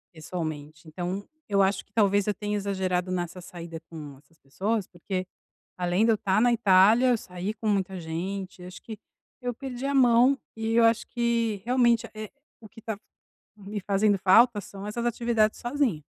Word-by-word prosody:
pessoalmente. 155 -2 -6
Então, 180 +5 -4 0.2
eu 200 -1 +3
acho 195 0 +1
que - - -38
talvez 205 -2 +3
eu 210 - +2
tenha 210 +2 -3
exagerado 190 -2 -1
nessa 175 0 -3
saída 170 -2 -8
com 150 -4 -9
essas 160 +3 -26
pessoas, 195 +9 -2
porque 185 +1 -5 0.5
além 180 +4 +1
de 230 - +4
eu 220 - +4
estar 195 +1 +1
na 240 0 +4
Itália, 215 +2 +5
eu 245 - +4
saí 185 +1 -5
com 220 0 -4
muita 190 -2 0
gente. 180 +3 -5
Acho 180 0 -10
que 220 -2 -8 0.4
eu 245 -1 -3
perdi 265 +1 -5
a 280 - -1
mão 250 +1 +5 0.2
e 225 0 -2
eu 230 0 +5
acho 230 +1 +3
que, 230 -4 -1
realmente, 240 -2 +3
eh, 215 -1 -7 0.3
o 215 - -13
que 225 - -15
tá 220 -3 -4 0.6
me 205 0 -6
fazendo 200 +1 +2
falta 205 +3 +5
são 195 +2 -9
essas 235 +3 -3
atividades 230 -2 +1
sozinha. 240 - 0
200 Hz, 180 wpm, -27 LUFS, 180-230 Hz, 0.6 s, Itália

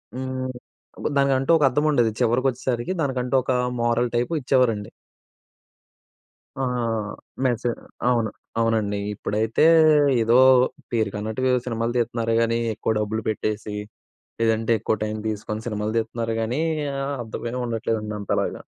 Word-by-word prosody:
హ్మ్, 130 0 -3 0.7
దానికంటూ 135 +1 +2
ఒక 150 - +1
అర్థముండేది, 135 -4 +2
చివరకొచ్చేసరికి 125 +3 0
దానికంటూ 130 -2 -1
ఒక 130 - 0 0.3
మోరల్ 120 +1 +1
టైపు 125 +8 0
ఇచ్చేవారండి. 120 -6 +1 1.7
ఆ! - - +1 0.8
మెసే 120 -1 +1 0.4
అవును. 115 -3 +2 0.3
అవునండి. 110 -3 +1
ఇప్పుడైతే 110 +5 0 0.6
ఏదో 115 +2 +4 0.5
పేరుకన్నట్టుగా 110 +2 -1
ఏవో 125 - +3
సినిమాలు 115 0 -1
తీత్తున్నారు 115 -1 0
గానీ, 115 0 +1 0.2
ఎక్కువ 110 - -1
డబ్బులు 110 +1 -2
పెట్టేసి, 105 0 -3 0.7
లేదంటే 115 0 +2
ఎక్కువ 110 - 0
టైం 110 0 -3
దీసుకొని 105 +1 -4
సినిమాలు 105 0 -2
తీత్తున్నారు 115 0 -2
గానీ 120 +7 -1 0.4
ఆహ్, 140 +1 -2
అర్థమే 115 +2 -5
ఉండట్లేదండి 110 -2 -2
అంతలాగా. 100 - -1
115 Hz, 110 wpm, -23 LUFS, 110-125 Hz, 1.7 s, ఏదో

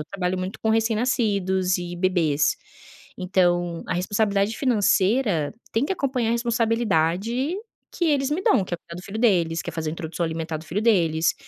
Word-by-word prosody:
eu 150 - -4
trabalho 185 -1 -2
muito 185 +2 -5
com 220 - 0
recém-nascidos 215 -5 +1
e 175 0 -5
bebês, 170 -5 +1 0.6
então 175 -2 +1
a - - -2
responsabilidade 200 +3 0
financeira 210 - +2 0.2
tem 225 +4 +1
que 325 - -1
acompanhar 265 -9 -1
a - - +2
responsabilidade 230 - 0 0.4
que 350 - -2
eles 280 -3 +1
me 305 +5 0
dão, 410 - +3
que 185 - -12
é - - +1
cuidar 170 - -12
do - - -9
filho 200 +2 -6
deles, 175 -8 +2
que - - -8
é - - -3
fazer 160 -2 -3
introdução 165 +1 -4
alimentar 160 0 -3
do 155 - -10
filho 175 +6 -2
deles, 170 -8 +2
195 Hz, 180 wpm, -24 LUFS, 175-230 Hz, 0.6 s, dão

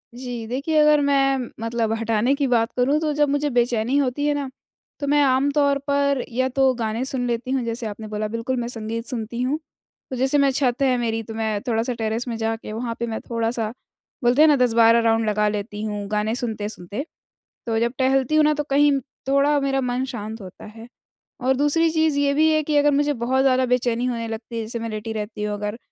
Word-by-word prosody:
जी, 245 -2 -6
देखिए 275 +7 -1
अगर 300 -1 +5
मैं 270 -3 +2
मतलब 230 0 -1
हटाने 230 +3 +1
की 280 0 0
बात 235 -2 +2
करूँ, 275 +4 +2
तो 310 -1 -1
जब 295 0 +2
मुझे 290 +1 0
बेचैनी 240 0 +1
होती 285 +1 0
है 295 - +2
ना, 285 -2 -3 0.5
तो 285 - -3
मैं 290 +1 +4
आम 265 +1 +3
तौर 285 -1 +2
पर 280 -2 +1
या 255 +2 0
तो 265 0 +3
गाने 225 0 -2
सुन 260 -2 -2
लेती 240 +2 -2
हूँ, 265 -2 0
जैसे 230 0 -4
आपने 215 +1 -7
बोला, 215 0 -3
बिल्कुल, 230 +4 -3
मैं 235 - -3
संगीत 230 -1 -5
सुनती 235 -1 -4
हूँ। 270 +5 0 0.5
तो 260 - -4
जैसे 265 +3 +1
मैं 280 -1 +4
छत 260 -1 0
है 260 -2 +3
मेरी, 225 -2 -1
तो 225 - -8
मैं 220 -2 -2
थोड़ा-सा 230 +1 0
टेरेस 225 +1 -3
में 235 - -3
जाके 225 -1 -3
वहाँ 230 +1 -3
पे 235 - -2
मैं 220 -1 -3
थोड़ा-सा, 230 -1 -1 0.5
बोलते 245 +4 +4
हैं 315 - +8
ना 295 - +5
10-12 230 -2 +4
राउंड 225 0 +2
लगा 210 0 +1
लेती 210 0 -4
हूँ 210 -1 -3
गाने 210 +1 0
सुनते-सुनते। 215 - -4 0.6
तो 225 -2 0
जब 235 +1 0
टहलती 265 +2 +2
हूँ 310 - +5
ना, 300 0 +4
तो 295 0 -2
कहीं 290 0 +3 0.4
थोड़ा 280 +2 +3
मेरा 270 -1 0
मन 250 +1 -1
शांत 225 -3 -6
होता 185 -2 -11
है। 225 +2 -11 0.5
और 260 +1 +2
दूसरी 295 +4 +2
चीज़ 315 -2 +1
ये 285 0 +2
भी 315 +2 +4
है 310 0 +2
कि 300 0 -1
अगर 290 0 +5
मुझे 290 +1 +2
बहुत 260 +1 0
ज़्यादा 260 -1 +3
बेचैनी 245 -1 0
होने 235 -2 -2
लगती 225 +1 -6
है, 230 - -2
जैसे 225 +2 -5
मैं 230 0 -4
लेटी 220 +1 -5
रहती 210 0 -5
हूँ 210 0 -1
अगर, 210 +2 -4
245 Hz, 220 wpm, -22 LUFS, 225-275 Hz, 0.6 s, हैं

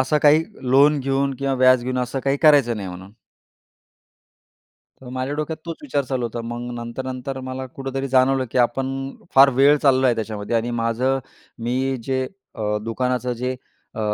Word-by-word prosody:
"असं 130 +3 +2
काही 150 +2 +6 0.3
लोन 145 +3 +5
घेऊन 135 +1 0
किंवा 135 -1 0
व्याज 130 -1 +5
घेऊन 130 0 -2
असं 125 +2 -2
काही 135 0 +2
करायचं 140 -7 +5
नाही" 100 -3 -5
म्हणून. 95 +2 -10 1.9
तर 130 - -11
माझ्या 130 +2 -3
डोक्यात 155 +1 -3
तोच 165 -1 -4
विचार 140 0 -1
चालू 130 -2 -2
होता. 115 +1 -5
मग 120 +1 -5 0.2
नंतर-नंतर 130 +2 -5
मला 130 0 -5
कुठेतरी 135 +1 -5
जाणवलं, 130 0 +3
की - - 0
आपण 130 +2 +1 0.5
फार 135 +1 +8
वेळ 140 +2 +6
चाललो 135 -2 +3
आहे 125 - +3
त्याच्यामध्ये 110 0 -3
आणि 115 +1 -1
माझं 125 +4 +1 0.5
मी 130 +2 0
जे 130 0 -1 0.3
अ, 105 -2 -1
दुकानाचं 125 +2 -1
जे 125 +1 -1 0.4
अ, - - -5
130 Hz, 165 wpm, -22 LUFS, 120-135 Hz, 1.9 s, फार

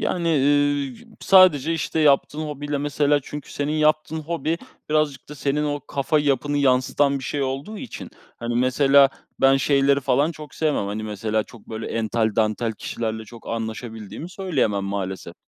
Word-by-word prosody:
Yani, 170 -2 -1
eee, 145 - +1
sadece, 175 -6 +5
işte, 160 0 -2
yaptığın 150 0 +3
hobiyle 145 -1 -3
mesela, 145 0 +1
çünkü, 150 +2 -8
senin 145 +1 -2
yaptığın 155 +1 +1
hobi, 165 +1 -2 0.3
birazcık 150 -3 0
da, 150 - -8
senin 145 +2 -1
o 145 0 -2
kafa 140 +3 0
yapını 145 0 0
yansıtan 140 +1 +2
bir 130 - -8
şey 145 0 -2
olduğu 135 +11 -4
için, 255 - -8 0.3
hani, 120 0 -4
mesela, 135 +3 +5 0.3
ben 135 0 +6
şeyleri 140 0 +3
falan 140 +4 +1
çok 150 -3 -11
sevmem. 150 -10 0
Hani, 105 +2 -4
mesela, 110 +1 -1
çok 115 -4 -16
böyle, 110 0 -5
ental 110 -1 -1
dantel 110 +1 +1
kişilerle, 110 0 -4
çok 115 +1 -13
anlaşabildiğimi 110 - -5
söyleyemem 135 - -1
maalesef. 95 -1 -4
140 Hz, 155 wpm, -23 LUFS, 115-150 Hz, 0.3 s, ben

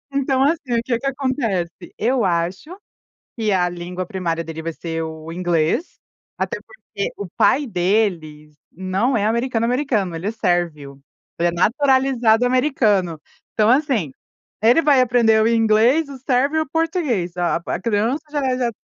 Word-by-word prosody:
Então 270 -1 +1
assim, 285 -4 0
o 230 - +1
que 235 -1 -1
que 275 - -9
acontece? 255 -10 -1 0.3
Eu 245 +1 +1
acho 180 - -1 0.7
que 220 -2 0
a 180 -1 +2
língua 175 +1 -6
primária 170 -3 -3
dele 160 0 -7
vai 165 0 -4
ser 165 0 -4
o 160 0 -7
inglês, 175 - -1 0.4
até - - -2
porque 205 - -6
o 200 - -5
pai 290 +2 +3
dele 175 - -1 0.2
não 190 +8 -1
é 205 -2 +1
americano, 230 +1 0
americano, 240 - 0
ele 165 +4 -4
é 215 - 0
sérvio. 170 -9 -2 0.4
Ele 170 - +2
é - - -2
naturalizado 245 +3 +2
americano, 225 - +1 0.4
então 215 0 +3
assim, 250 - +1 0.5
ele 240 +9 +5
vai 290 -4 +4
aprender 230 -3 +3
o - - +3
inglês, 230 +6 +3
o 275 - -8
sérvio 265 +4 +1
e - - +2
o 310 - -18
português. 295 - -1
A 175 -1 +1
a - - -2
a - - -6
criança 230 +7 0
já 295 - -1
é 255 -1 0
já 245 -2 0
é - - -2
220 Hz, 170 wpm, -20 LUFS, 175-260 Hz, 0.7 s, ele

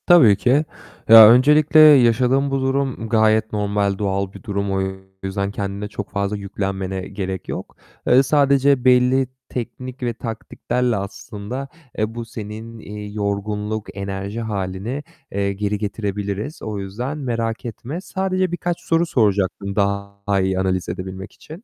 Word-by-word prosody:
Tabii 155 - +7
ki. 140 +5 +2 0.4
Ya, 110 -1 +11
öncelikle 150 +5 +5
yaşadığın 135 -2 +5
bu 135 0 0
durum 130 -4 -1
gayet 110 -1 +3
normal, 100 -1 0
doğal 100 -1 -2
bir - - -12
durum. 100 -3 -2
O 95 0 0 0.4
yüzden 100 +1 -2
kendine 100 0 -4
çok 105 -1 -6
fazla 100 +1 -1
yüklenmene 95 -1 -3
gerek 95 -2 -5
yok. - - -6 0.3
Eee, 130 +2 +6
sadece 140 -2 +3
belli 125 +1 +4 0.2
teknik 125 +2 -6
ve 120 -1 0
taktiklerle 120 +1 -2
aslında, 100 +6 -6 0.3
eee, 110 +1 -1
bu 120 -1 -5
senin, 110 0 -8
iii, 105 -1 -8
yorgunluk, 105 +1 -2
enerji 100 +3 -4
hâlini, 105 +5 -4 0.3
eee, 100 0 -1
geri 105 +1 -2
getirebiliriz. 105 - -4
O 105 -2 -4
yüzden 120 +10 -4
merak 115 -4 -3
etme. 125 +8 -6
Sadece 185 -2 -1
birkaç 175 0 -2
soru 165 0 +1
soracaktım 100 - 0
daha 100 0 -1
iyi 95 0 0
analiz 95 -1 -1
edebilmek 95 +1 -6
için. 165 +8 -12
110 Hz, 140 wpm, -21 LUFS, 100-130 Hz, 0.4 s, Ya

